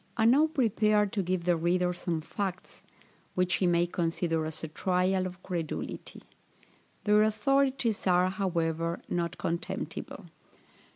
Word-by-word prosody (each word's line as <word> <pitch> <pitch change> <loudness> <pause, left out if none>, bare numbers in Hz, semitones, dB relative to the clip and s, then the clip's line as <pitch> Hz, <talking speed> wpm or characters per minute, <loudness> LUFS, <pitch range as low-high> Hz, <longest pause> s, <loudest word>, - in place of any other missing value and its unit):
I 220 - +3
now 280 +7 +6
prepare 215 - +2
to 200 0 -2
give 185 -1 -1
the 175 0 +3
reader 180 +2 +1
some 170 -2 -3
facts, 185 +2 -5 0.5
which 180 0 +2
he 185 - +2
may 175 0 +3
consider 165 -1 -1
as 160 0 -4
a - - -2
trial 185 +3 +1
of 185 0 -11
credulity. 170 -4 -5 0.8
Their 210 0 +5
authorities 235 +1 +1
are, 180 0 +4
however, 170 -3 -1
not 170 -1 -2
contemptible. 170 +1 -4
180 Hz, 130 wpm, -29 LUFS, 170-210 Hz, 0.8 s, now